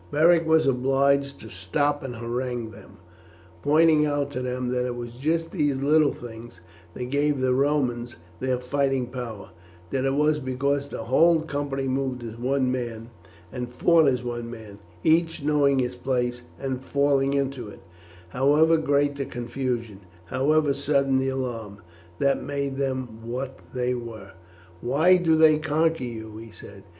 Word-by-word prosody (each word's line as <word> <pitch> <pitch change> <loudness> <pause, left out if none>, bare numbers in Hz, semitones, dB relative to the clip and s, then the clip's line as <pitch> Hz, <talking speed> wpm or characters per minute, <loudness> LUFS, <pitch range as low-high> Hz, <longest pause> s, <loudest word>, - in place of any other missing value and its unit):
Beric 165 +2 +4
was 160 0 +4
obliged 140 +1 +2
to 110 - -10
stop 145 - -1
and 125 -3 -5
harangue 120 0 -3
them, - - -15 0.6
pointing 155 - +4
out 145 -1 0
to 130 - -4
them 125 0 -2
that 125 0 0
it 125 -1 -3
was 120 -1 -7
just 160 +6 -1
these 145 -2 +1
little 145 +2 +3
things 115 -4 -10 0.4
that 125 0 -5
gave 145 0 +1
the 130 -1 +2
Romans 125 -4 0 0.2
their 130 -1 0
fighting 135 0 0
power; 120 -6 -7 0.4
that 130 -1 0
it 135 0 +1
was 150 +1 +2
because 140 +1 -1
the 115 - -5
whole 160 +7 +4
company 140 -3 -3
moved 130 -2 -2
as 115 -1 -7
one 130 +2 0
man, 120 -2 -4 0.4
and 125 -1 -5
fought 160 +5 +4
as 125 -2 +1
one 120 -1 -4
man, 110 -4 -10 0.2
each 165 -1 +2
knowing 145 -2 +3
his 125 -1 -1
place 125 -2 -1 0.2
and 130 -2 -3
falling 140 0 +1
into 135 -4 -2
it, 105 - -12 0.5
however 150 - +4
great 145 -2 +1
the 140 - -2
confusion, 120 -3 -4 0.3
however 145 - +2
sudden 140 -1 +1
the 135 0 0
alarm, 120 -6 -4 0.4
that 140 +6 +1
made 140 -1 -3
them 130 -4 -3
what 130 +3 -5 0.2
they 125 0 0
were. 115 -5 -7 0.5
"Why 160 +9 +4
do 165 -3 +3
they 155 -1 +5
conquer 160 -1 +1
you?" 110 -2 -7
he 115 +1 -10
said. 100 -2 -13
135 Hz, 160 wpm, -25 LUFS, 120-145 Hz, 0.6 s, they